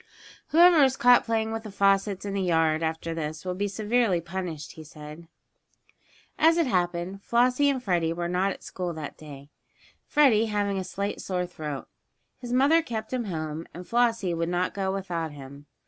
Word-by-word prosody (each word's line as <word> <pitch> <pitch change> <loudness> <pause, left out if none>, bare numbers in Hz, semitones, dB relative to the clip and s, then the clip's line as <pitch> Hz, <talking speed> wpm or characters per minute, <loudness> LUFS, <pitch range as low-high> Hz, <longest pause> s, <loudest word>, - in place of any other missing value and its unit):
"Whoever 335 -1 +6
is 265 0 +2
caught 245 0 +5
playing 225 -1 0
with 225 0 -3
the 220 - -9
faucets 195 0 +1
in 200 - -3
the 200 - -1
yard 160 -3 +2
after 160 +1 -2
this 155 0 -5
will 180 - -2
be 200 +3 -2
severely 210 -1 +1
punished," 170 -3 -6
he 160 - -11
said. 150 +2 -11 1.1
As 325 +2 +5
it 335 - +3
happened, 180 -3 -1
Flossie 250 +6 +2
and 260 -3 -1
Freddie 175 -5 +1
were 170 +1 -3
not 185 +3 0
at - - -9
school 180 -2 -4
that 155 -3 -7
day, 145 -2 -12 0.6
Freddie 235 -7 +4
having 205 -2 -1
a - - -3
slight 200 +2 -4
sore 180 -1 -2
throat. 150 -5 -6 0.5
His 245 -2 -7
mother 280 +6 +4
kept 225 -6 -5
him 245 -2 -1
home, 160 -3 -5
and 180 +1 -9
Flossie 230 -5 +1
would 165 0 -1
not 180 +1 -1
go 190 -1 -1
without 175 -5 -3
him. 140 +1 -12
190 Hz, 180 wpm, -26 LUFS, 165-225 Hz, 1.1 s, Whoever